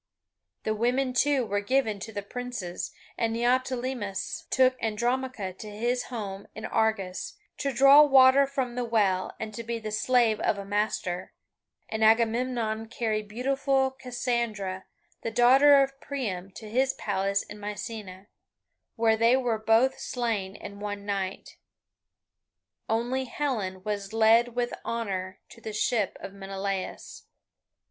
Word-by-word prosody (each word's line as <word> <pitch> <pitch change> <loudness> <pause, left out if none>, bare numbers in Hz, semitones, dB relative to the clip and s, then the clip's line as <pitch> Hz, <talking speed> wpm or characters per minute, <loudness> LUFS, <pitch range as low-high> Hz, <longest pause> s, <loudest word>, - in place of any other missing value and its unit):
The 215 - 0
women, 250 +4 0
too, 275 0 +2
were 205 -1 -1
given 220 -2 +1
to 220 - -7
the 205 -2 -5
princes, 225 -6 -5 0.3
and 230 -1 +1
Neoptolemus 245 -3 -1
took 260 0 +4
Andromache 235 -2 -1
to 215 - -7
his 240 +4 -1
home 200 -5 -6
in 220 - -6
Argos, 200 -5 -1 0.2
to 280 - 0
draw 275 +3 +8
water 270 -1 +6
from 265 -3 -2
the 245 0 -2
well 205 -5 +1
and 220 -1 -5
to 230 - -5
be 230 0 -3
the 220 -1 -6
slave 230 0 +2
of - - +1
a 200 - -6
master, 200 -3 -2 0.5
and 220 0 -2
Agamemnon 225 0 +2
carried 220 -2 -2
beautiful 265 +3 +1
Cassandra, 235 -7 -3 0.4
the - - -2
daughter 270 +5 +6
of 270 0 -6
Priam, 205 -10 -4
to 220 - -9
his 260 +5 +1
palace 200 0 -1
in 210 - -11
Mycenae, 205 -2 -6 0.7
where 225 -2 +3
they 230 +3 +4
were 240 -4 0
both 225 +4 +3
slain 220 -6 -2
in 200 0 -9
one 205 -1 -5
night. 195 -2 -4 1.3
Only 240 +4 0
Helen 220 -9 -3
was 205 -1 -4
led 225 +2 +4
with 245 0 -1
honour 195 -5 -3
to 230 - -15
the 220 - -6
ship 215 -1 0
of 195 - -7
Menelaus. 195 -1 -5
225 Hz, 140 wpm, -27 LUFS, 205-250 Hz, 1.3 s, draw